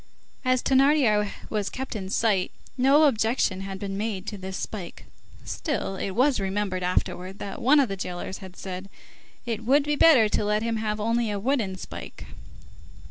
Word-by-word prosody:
As 255 -1 +2
Thénardier 265 -7 +4 0.2
was 210 -2 -1
kept 260 -2 -5
in 190 -3 -4
sight, 200 -3 +1 0.3
no 275 +4 +5
objection 225 -7 +2
had 195 0 -5
been 195 0 -4
made 210 -3 -3
to 215 - -4
this 190 0 -5
spike. 185 -6 -6 0.4
Still, 290 - -3
it 190 0 -4
was 260 0 +3
remembered 195 -1 -1
afterwards, 180 +1 -1
that 200 -1 -6
one 285 +5 +5
of 275 - +4
the 195 - -3
jailers 180 0 -5
had 185 -1 -11
said: 190 0 -6 0.6
"It 230 -2 -3
would 275 +5 +4
be 295 +1 0
better 285 -8 +6
to 210 - 0
let 210 +1 +1
him 230 -1 -1
have 215 -1 -2
only 230 +1 +1
a 205 - -2
wooden 220 -3 0
spike." - - -8
210 Hz, 175 wpm, -26 LUFS, 195-255 Hz, 0.6 s, better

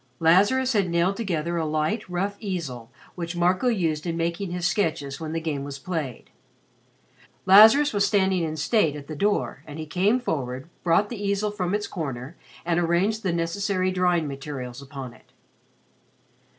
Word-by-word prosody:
Lazarus 205 +11 +4
had 200 -4 +1
nailed 170 +3 +1
together 170 -6 -2
a 165 - 0
light, 155 +8 -1
rough 195 +3 -2
easel 155 - -5 0.2
which 170 0 -5
Marco 180 +7 +2
used 170 -8 0
in 165 -1 -2
making 170 +3 -2
his 175 0 -3
sketches 155 -7 -1
when 160 -1 -5
the 165 - -1
game 155 -4 -3
was 140 -1 -6
played. 150 -5 -5 1.1
Lazarus 220 +10 +7
was 200 -1 +2
standing 190 -3 +2
in 155 -1 -3
state 160 -1 +2
at 145 -1 -8
the 155 - -7
door, 205 +7 0
and 150 0 -8
he 160 - -5
came 190 +10 +2
forward, 130 - -3
brought 180 +4 +2
the 215 -4 -6
easel 200 +1 0
from 195 -2 -1
its 210 0 -2
corner, 140 -6 -5 0.3
and 170 0 +1
arranged 175 +6 +1
the 190 - 0
necessary 185 +3 0
drawing 180 -3 +1
materials 135 -2 -6
upon 135 -3 -8
it. - - -22
175 Hz, 165 wpm, -25 LUFS, 155-200 Hz, 1.1 s, Lazarus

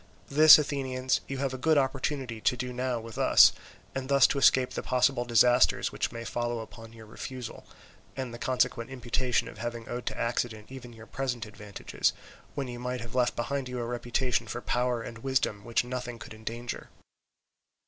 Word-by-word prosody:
This, 155 +2 +9
Athenians, 130 -3 -1
you 135 - -4
have 135 -1 -1
a 130 - -5
good 160 +3 +3
opportunity 135 -3 -1
to 125 - +2
do 125 0 -4
now 125 -1 -1
with 115 0 -9
us, - - +7 0.4
and 130 0 -4
thus 140 -1 +6
to 140 - +1
escape 130 -1 +4
the - - -4
possible 125 0 +1
disasters 120 +1 +4
which - - -2
may 115 0 -6
follow 120 +1 -2
upon 115 0 -11
your 115 -1 -13
refusal, 125 +3 -8 0.5
and 130 -3 -4
the 120 - -8
consequent 125 -1 0
imputation 125 -1 -1
of - - -10
having 120 -1 -5
owed 120 0 -5
to - - -3
accident 115 -1 -2
even 130 -2 -9
your 110 -1 -13
present 125 -3 -3
advantages, 105 -1 -2 0.4
when 140 -2 -3
you 120 -1 -7
might 125 0 -3
have 115 -1 -9
left 125 -1 +1
behind 130 +2 -2
you 125 - -5
a 120 - -2
reputation 120 0 -1
for 120 - -4
power 125 -1 -1
and 115 0 -8
wisdom 125 -5 -1
which 115 +2 +1
nothing 125 -1 -5
could 110 - -10
endanger. 115 +2 -6
125 Hz, 185 wpm, -29 LUFS, 115-130 Hz, 0.5 s, This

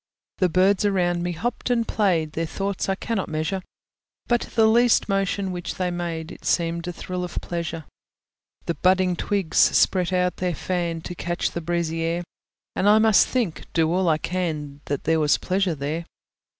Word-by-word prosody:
The 185 - +3
birds 185 +3 +3
around 180 -4 +1
me 175 0 -2
hopped 235 +10 -3
and 235 -2 +1
played, 175 -7 +1
Their 165 +1 -2
thoughts 195 +3 -3
I 195 - +2
cannot 205 -1 -3
measure: 160 +5 -2 0.6
But 240 -1 +2
the 225 -2 +5
least 235 +2 +4
motion 195 -1 0
which 175 -1 -5
they 180 -1 -1
made 170 -1 -4
It - - -12
seemed 170 0 0
a - - -2
thrill 180 +1 -5
of 180 - -6
pleasure. 165 -2 -4 0.8
The 170 - 0
budding 185 +3 +2
twigs 195 -1 -1
spread 185 -1 +4
out 180 -1 +1
their 180 -2 -1
fan, 170 -2 -2
To 175 - -6
catch 175 0 -2
the 170 - -4
breezy 165 -1 -1
air; 165 +2 -1 0.5
And 200 - +3
I 210 - +7
must 220 -2 +5
think, 230 -11 -2
do 165 0 +2
all 185 -1 +2
I 155 - +3
can, 155 -5 -3
That 145 -1 -3
there 160 0 +2
was 150 -1 +3
pleasure 185 -2 0
there. 150 +4 -3
175 Hz, 180 wpm, -24 LUFS, 165-195 Hz, 0.8 s, I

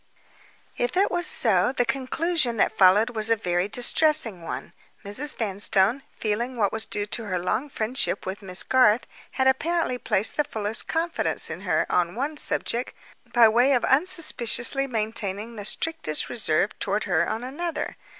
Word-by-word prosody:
If 245 +7 -1
it 395 - +3
was 350 -1 +1
so, 210 -1 +3
the 245 -2 +1
conclusion 275 0 -1
that 215 - +1
followed 205 +5 +5
was 220 -1 -3
a 230 - +4
very 180 -3 -1
distressing 245 - +1
one. 165 - -6 0.3
Mrs. 260 +9 -3
Vanstone, 205 +2 +1
feeling 235 +4 -3
what 205 -4 +1
was 220 0 -2
due 205 - -3
to 220 +2 -4
her 185 -3 -2
long 220 +10 -2
friendship 245 +1 -1
with 190 +2 -5
Miss 185 -2 -5
Garth, 250 -3 +3 0.3
had 265 - 0
apparently 265 0 +1
placed 205 -2 0
the 295 - +3
fullest 220 -4 -5
confidence 330 +1 -1
in - - -6
her, - - +1
on 175 0 0
one 285 +6 -3
subject, 245 -3 -1 0.4
by 235 -2 +6
way 245 +5 +3
of 245 - +2
unsuspiciously 275 -4 +2
maintaining 220 -2 -3
the 205 -2 -7
strictest 265 - -1
reserve 200 -4 +1
toward 205 +2 -1
her 170 -3 +1
on 220 +2 -3
another. 320 +7 -4
230 Hz, 160 wpm, -25 LUFS, 205-270 Hz, 0.4 s, by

